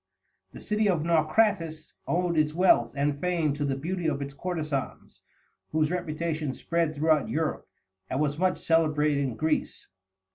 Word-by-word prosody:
The - - -11
city 210 0 0
of 170 -5 +1
Naucratis 165 -1 +1
owed 175 0 0
its 155 0 +1
wealth 140 -10 +4
and 145 0 +1
fame 170 -5 +1
to 145 +1 -3
the 140 -1 0
beauty 170 +4 -2
of 140 -3 0
its 140 0 -5
courtesans, 155 -3 -4 0.5
whose 155 0 +2
reputation 160 -4 -2
spread 165 -2 -1
throughout 155 -1 +2
Europe, 155 0 -2 0.4
and 130 - -1
was 145 0 0
much 185 0 +2
celebrated 150 -3 +2
in 135 -5 -1
Greece. 155 0 -2
155 Hz, 150 wpm, -27 LUFS, 145-170 Hz, 0.5 s, wealth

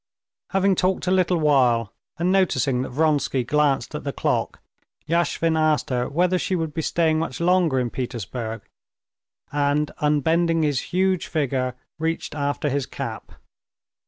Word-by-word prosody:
Having 195 -1 +2
talked 185 +1 +1
a 180 - +1
little 185 -1 +3
while, 125 -8 +3 0.2
and 175 +2 +1
noticing 140 -9 +2
that 130 - -4
Vronsky 145 -2 +1
glanced 145 +1 +1
at - - -5
the - - -2
clock, - - -1 0.5
Yashvin 165 0 +1
asked 155 -3 +1
her 125 -1 0
whether 180 +4 +1
she 190 - -1
would 160 -3 -2
be 160 - -2
staying 160 0 +1
much 130 -6 -3
longer 170 -5 +3
in 120 -2 -2
Petersburg, 115 -3 -5 0.9
and 145 +1 +1
unbending 160 +3 +2
his 145 -4 +1
huge 185 -1 +1
figure 130 -4 -1 0.2
reached 160 -1 -2
after 145 0 -1
his 140 -1 -1
cap. - - -6
150 Hz, 145 wpm, -23 LUFS, 130-170 Hz, 0.9 s, little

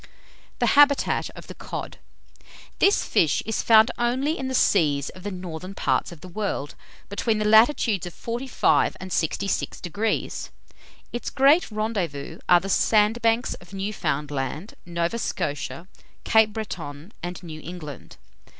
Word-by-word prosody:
THE - - +1
HABITAT 285 -1 +4
OF - - -10
THE - - -9
COD. - - -7 0.8
This 400 - +4
fish 155 -4 +2
is 220 0 -1
found 220 +1 +6
only 260 +6 +1
in 265 - -4
the 260 - -2
seas 150 - +3
of 185 - -12
the 205 - -4
northern 185 0 -7
parts - - 0
of 165 -3 -12
the 185 - -10
world, 180 -6 -3 0.3
between 215 +2 -1
the 215 - -1
latitudes 220 - +4
of 175 - -10
45° 240 +3 +1
and 185 0 -8
66°. 195 +4 -2 0.6
Its 240 - -3
great 285 +5 +4
rendezvous 190 -9 -3
are 175 - +7
the 190 - -6
sandbanks 225 +4 +2
of 175 +2 -13
Newfoundland, 150 -4 -3
Nova 170 +6 -1
Scotia, 155 0 -3 0.4
Cape 220 -1 +4
Breton, 180 -6 -6
and 175 +1 -6
New 155 -2 -8
England. 160 -4 -9
195 Hz, 135 wpm, -24 LUFS, 170-225 Hz, 0.8 s, are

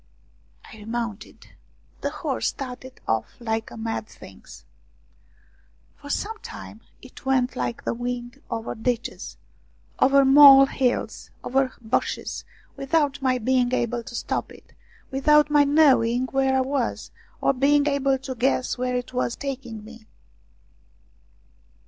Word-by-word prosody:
I - - -13
remounted. 225 0 -6 0.5
The - - -1
horse - - -2
started 260 -1 -7
off 110 -1 -1
like 225 -1 -3
a - - -11
mad 225 -1 -4
thing. 95 - -14 1.5
For 285 - -12
some 430 +8 -3
time 220 - -10 0.2
it 255 - -14
went 260 -2 +1
like 120 -2 -3
the - - -1
wind 240 0 -5
over 225 0 -4
ditches, 235 +1 -4 0.6
over 275 +1 +5
mole 275 0 +9
hills, 260 -2 -2
over 265 0 0
bushes, 220 -1 -2 0.3
without 290 0 0
my 260 -1 +2
being 250 +1 +1
able 240 -1 -1
to 235 - -10
stop - - -3
it, - - -17 0.4
without 300 +2 +4
my 295 -1 +5
knowing 260 -5 +4
where 270 -1 +2
I - - +3
was, 260 -2 -2 0.3
or - - +2
being 285 +2 +3
able 275 -2 +1
to 260 0 -6
guess 255 0 0
where 250 0 -1
it 250 +1 -4
was 250 -1 -1
taking 250 -6 -6
me. 225 -1 -14
255 Hz, 130 wpm, -24 LUFS, 235-275 Hz, 1.5 s, mole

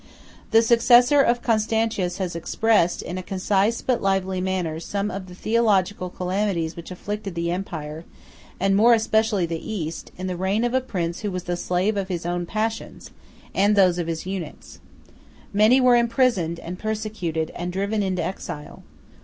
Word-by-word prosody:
The 225 +1 +5
successor 240 +4 +5
of 240 -2 +1
Constantius 220 -4 0
has 185 -3 -3
expressed, 180 +1 +1
in 180 +2 -5
a - - -4
concise 195 +4 0
but 250 -2 0
lively 190 -1 0
manner, 180 -4 -2
some 200 +4 -3
of 190 -1 -6
the 180 - -11
theological 205 -4 +1
calamities 180 -3 -2
which 170 - -9
afflicted 200 +1 -5
the 170 0 -1
empire, 160 -4 -5 0.6
and 195 +1 +2
more 230 +4 +6
especially 220 -3 +1
the 165 -1 -4
East, 165 -6 -5
in 185 - -5
the 185 -1 -2
reign 190 +5 0
of 240 0 0
a 260 - +3
prince 175 -8 -3
who 210 - -3
was 180 -2 -4
the 175 - -2
slave 180 +4 0
of 195 -1 -1
his 175 -3 -4
own 175 0 -2
passions, 220 +2 -4 0.4
and 200 +2 +3
of - - +2
those 185 -3 +4
of 170 - -2
his 165 0 -4
eunuchs: 185 -5 -7 0.7
"Many 215 +6 +5
were 250 -1 +5
imprisoned, 235 - +2
and 180 +2 -7
persecuted, 210 -7 -3
and 175 +1 -4
driven 200 +3 -1
into 185 -3 -1
exile. 150 -4 -6
195 Hz, 170 wpm, -23 LUFS, 175-220 Hz, 0.7 s, more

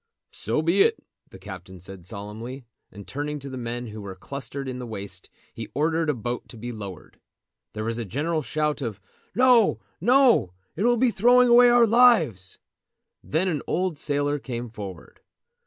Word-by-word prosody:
"So 155 - -1
be 175 +5 +3
it," - - +4 0.3
the - - -12
captain 95 -1 -10
said 90 -1 -10
solemnly; 110 +6 -7 0.3
and 100 0 -11
turning 150 +2 -3
to 140 -1 -8
the - - -6
men, 120 +1 -4
who 105 0 -8
were 95 -2 -7
clustered 140 +6 -7
in 130 -1 -5
the 125 - -6
waist, 100 -4 -7 0.2
he - - -7
ordered 160 +2 +1
a 150 - +1
boat 120 +1 -5
to 120 - -10
be 120 +2 -6
lowered. 100 -7 -9 0.5
There 110 - -4
was 115 +1 -2
a - - -2
general 155 - -1
shout 150 0 -1
of 110 -6 -4 0.4
"No! 250 -3 +5 0.2
no! 245 - +4 0.2
It 200 - -1
will 240 0 +4
be 250 +1 +3
throwing 245 +4 +5
away 245 +1 +8
our 240 -1 +6
lives!" 205 - +4 0.7
Then 165 +5 0
an 155 -6 -1
old 180 -4 -1
sailor 145 0 0
came 120 -3 -5
forward. 100 -6 -9
140 Hz, 175 wpm, -25 LUFS, 110-175 Hz, 0.7 s, away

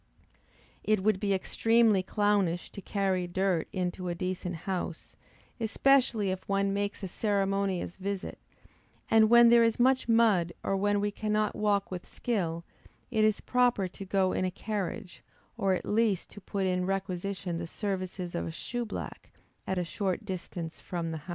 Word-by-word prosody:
It 215 -3 +1
would 215 -2 +2
be 200 -1 0
extremely 225 +2 +3
clownish 195 -3 0
to 200 - -8
carry 190 -3 0
dirt 185 -1 0
into 180 -1 -2
a 175 - -2
decent 180 0 -3
house, 180 -3 -4 0.4
especially 230 -3 +3
if 185 +1 -6
one 195 0 +1
makes 200 0 -2
a - - -2
ceremonious 195 -2 -1
visit; 195 0 -4 0.7
and, 220 -1 +6
when 235 0 +8
there 235 0 +7
is 230 0 +1
much 255 0 +3
mud, 215 -7 +4
or 195 - 0
when 205 +1 +1
we 205 0 0
cannot 215 0 0
walk 205 -2 +1
with 180 -1 -6
skill, 170 -8 -2 0.5
it 220 -2 +2
is 215 -1 +2
proper 245 -6 +2
to 190 - -9
go 190 -1 +1
in - - 0
a 185 - +1
carriage, 195 -2 -4 0.3
or 195 -1 +1
at - - -5
least 210 -4 +1
to 205 - -11
put 195 +1 -2
in 180 0 0
requisition 190 -2 -3
the 170 - -4
services 185 -2 -4
of 85 - -2
a - - -4
shoe 240 - -4
black 215 - -7 0.4
at 190 - -1
a 180 - +1
short 190 +3 -2
distance 175 -3 -6
from 170 -2 -4
the 160 - -3
house. 150 - -17
195 Hz, 170 wpm, -29 LUFS, 185-215 Hz, 0.7 s, when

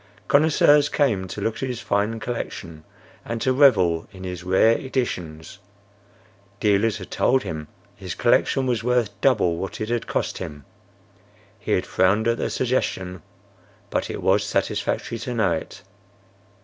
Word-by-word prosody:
Connoisseurs 145 0 +4
came 110 -11 +1
to - - -6
look 110 - -2
at 130 - -2
his 125 -2 -4
fine 105 +1 -1
collection 85 -9 -6 0.4
and 115 0 -4
to 130 +3 +1
revel 95 - +4
in 95 -2 -11
his 90 -1 -6
rare 95 +5 +4
editions. 90 - -4 1.0
Dealers 105 +1 +2
had 95 - -10
told 130 +1 +2
him 80 -5 -5 0.3
his - - -6
collection 135 - +2
was 120 -3 0
worth 125 -3 +1
double 110 -11 +3
what 95 - -5
it 110 - -3
had 120 -1 -1
cost - - -2
him. 75 -2 -7 0.9
He 105 - -2
had 90 - +1
frowned 100 +5 +2
at 115 0 +1
the - - -1
suggestion; 95 -8 -2 0.7
but - - -1
it - - -5
was - - +3
satisfactory 115 - -2
to 120 +2 -4
know 105 -6 +2
it. 80 -1 -5
110 Hz, 150 wpm, -23 LUFS, 90-125 Hz, 1.0 s, Connoisseurs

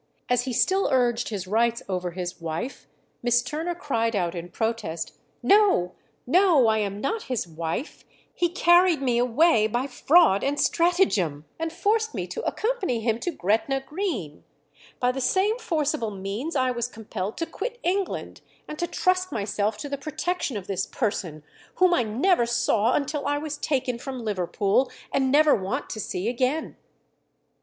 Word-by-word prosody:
As 245 0 +2
he 260 - -2
still 380 - +2
urged 245 -2 +2
his 200 -4 -4
rights 230 +4 +1
over 180 -2 -2
his 175 0 -6
wife, 165 +11 -5 0.3
Miss 240 0 +3
Turner 320 +7 -3
cried 230 -9 -1
out 175 -4 0
in 175 -1 -6
protest, 220 -7 -3 0.3
"No, 395 - +4 0.3
no, 340 -2 +5
I 220 -1 +3
am 200 -1 -2
not 435 - -2
his 245 -8 -1
wife; 165 - -5 0.3
he 345 - +1
carried 350 -1 +4
me 245 -3 +1
away 245 -1 +4
by 240 +4 -1
fraud 280 - +4
and 285 +1 0
stratagem, 275 - +2
and 325 0 -2
forced 440 +5 0
me - - -2
to - - -4
accompany 425 - -1
him 225 0 0
to 355 - -2
Gretna 250 - 0
Green.... 270 - -4 0.6
By 250 0 +2
the 265 +1 -4
same 390 - +2
forcible 310 - -1
means 205 - -4
I 255 -2 +2
was 240 -1 -2
compelled 215 -4 -6
to 330 - -1
quit 470 +8 -5
England, 380 +2 -2 0.3
and 305 - -7
to 345 - 0
trust 370 +1 +1
myself 205 +1 -1
to 285 - -6
the 280 -1 -4
protection 305 -2 -2
of 195 - -7
this 195 -1 -2
person, 175 - -3 0.3
whom 365 -1 +4
I 300 - +3
never 240 - +2
saw 235 -1 +2
until 290 0 -1
I 290 0 +1
was 300 0 -4
taken 255 -4 -1
from 260 -3 -6
Liverpool, 200 +5 +1 0.2
and 265 -1 +1
never 300 +1 +6
want 190 -2 -2
to 215 - -5
see 185 -1 -3
again." 255 +6 -1
250 Hz, 165 wpm, -25 LUFS, 210-325 Hz, 0.6 s, never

